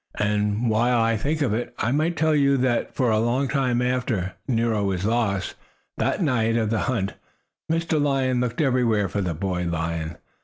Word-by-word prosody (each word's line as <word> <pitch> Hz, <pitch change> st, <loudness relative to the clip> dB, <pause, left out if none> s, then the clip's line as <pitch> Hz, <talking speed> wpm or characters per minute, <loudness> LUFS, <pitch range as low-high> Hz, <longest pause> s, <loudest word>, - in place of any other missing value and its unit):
And, 105 Hz, +2 st, 0 dB
while 120 Hz, +2 st, +2 dB
I 115 Hz, 0 st, +2 dB
think 145 Hz, +8 st, -1 dB
of 120 Hz, -7 st, 0 dB
it, 120 Hz, +3 st, -3 dB
I 120 Hz, -, 0 dB
might 155 Hz, +5 st, 0 dB
tell 155 Hz, 0 st, +2 dB
you 140 Hz, -1 st, +3 dB
that 125 Hz, -2 st, 0 dB
for 125 Hz, -4 st, +2 dB
a 110 Hz, -, +2 dB
long 120 Hz, +5 st, +1 dB
time 125 Hz, -3 st, +1 dB
after 120 Hz, -7 st, -1 dB
Nero 115 Hz, -4 st, +1 dB
was 95 Hz, -1 st, -1 dB
lost, 105 Hz, -4 st, 0 dB, 0.5 s
that -, -, 0 dB
night 115 Hz, -6 st, +1 dB
of 110 Hz, -2 st, 0 dB
the 110 Hz, -, +1 dB
hunt, 100 Hz, -6 st, -1 dB, 0.6 s
Mr. 165 Hz, -2 st, +1 dB
Lion 135 Hz, -3 st, +1 dB
looked 125 Hz, +3 st, -1 dB
everywhere 120 Hz, -7 st, +2 dB
for 100 Hz, -, -2 dB
the 90 Hz, -4 st, -2 dB
boy 90 Hz, 0 st, -2 dB
lion. 85 Hz, -1 st, -3 dB
115 Hz, 185 wpm, -24 LUFS, 105-130 Hz, 0.6 s, you